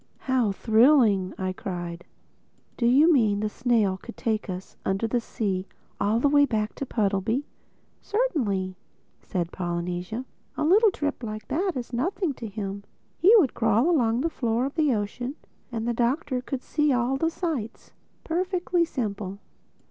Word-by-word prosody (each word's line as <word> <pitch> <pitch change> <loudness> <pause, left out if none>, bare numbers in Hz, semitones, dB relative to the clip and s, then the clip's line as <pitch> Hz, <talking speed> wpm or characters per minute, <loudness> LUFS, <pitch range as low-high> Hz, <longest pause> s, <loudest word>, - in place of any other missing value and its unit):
"How 255 -5 +1
thrilling!" 220 -3 +4
I 185 0 -2
cried. 175 -4 -6 0.7
"Do 235 - +1
you 295 +7 +6
mean 215 -7 +3
the 215 0 -1
snail 220 -5 +1
could 235 - -10
take 220 -3 -1
us 185 +1 -6
under 195 +3 0
the 235 +2 0
sea 195 -4 -2 0.3
all 215 +3 +2
the 285 - +3
way 285 0 +5
back 220 -5 0
to 275 - -4
Puddleby?" 215 +5 0 0.6
"Certainly," 225 - -1 0.4
said 175 -2 -3
Polynesia, 180 +6 -3 0.3
"a 305 - 0
little 420 +7 +6
trip 290 -7 -3
like 215 -2 -6
that 360 +7 0
is 245 -1 -5
nothing 330 - -1
to 235 -3 -7
him. 200 -1 -5 0.4
He 405 +6 +7
would 305 - +3
crawl 230 +7 +2
along 240 -6 +2
the 330 - +1
floor 235 -2 0
of 275 - -4
the 310 -4 +2
ocean 245 +5 -2 0.4
and 230 -1 -3
the 240 - +1
Doctor 250 +2 0
could 255 0 -5
see 300 -1 +1
all 250 +1 +1
the 325 +4 +1
sights. 310 - -4 0.3
Perfectly 355 0 0
simple. 205 - -3
235 Hz, 155 wpm, -26 LUFS, 205-285 Hz, 0.7 s, He